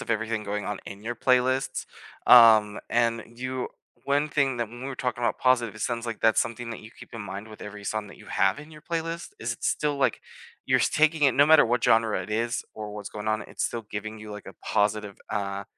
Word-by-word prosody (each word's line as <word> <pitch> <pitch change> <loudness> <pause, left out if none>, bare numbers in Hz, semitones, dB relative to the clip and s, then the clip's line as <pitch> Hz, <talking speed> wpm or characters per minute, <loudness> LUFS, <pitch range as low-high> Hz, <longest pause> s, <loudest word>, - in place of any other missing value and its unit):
of - - -6
everything 110 -1 -1
going 105 0 -3
on 105 -1 -3
in 100 +1 -9
your 120 +2 -3
playlists, 130 +1 +1 0.4
um, 110 -3 +8
and 115 -1 +1
you 130 +1 -3 0.4
one 145 +2 +1
thing 140 -3 +1
that 120 -2 -2
when 120 +2 -11
we - - -4
were 135 - -5
talking 125 -1 -3
about 115 - 0
positive, 125 -4 +2
it 105 - -11
sounds 120 -1 -2
like 115 -2 -5
that's 110 -1 +4
something 115 0 -4
that 115 - -6
you 110 - -12
keep - - -12
in 115 - -6
mind 100 +1 -7
with 110 - -12
every 105 0 -8
song 110 0 -2
that - - -13
you - - -16
have 95 +3 +1
in 150 +2 -11
your 155 -1 -13
playlist, 165 +1 -3
is - - -2
it's - - -2
still, 150 -1 0
like, 130 -4 +1 0.4
you're - - +3
taking 155 0 +2
it 135 - +4
no 145 - +6
matter 155 -2 +7
what 120 +1 0
genre 115 -4 +3
it 95 +3 -8
is, 115 +2 -1
or 105 -1 -6
what's 105 -1 -7
going 105 0 -5
on, 110 -1 0
it's - - -6
still 115 -2 -2
giving 110 +1 -5
you 110 0 -10
like 105 - -9
a - - -10
positive, 105 -1 0
uh, 100 -1 -3
115 Hz, 240 wpm, -26 LUFS, 105-130 Hz, 0.4 s, um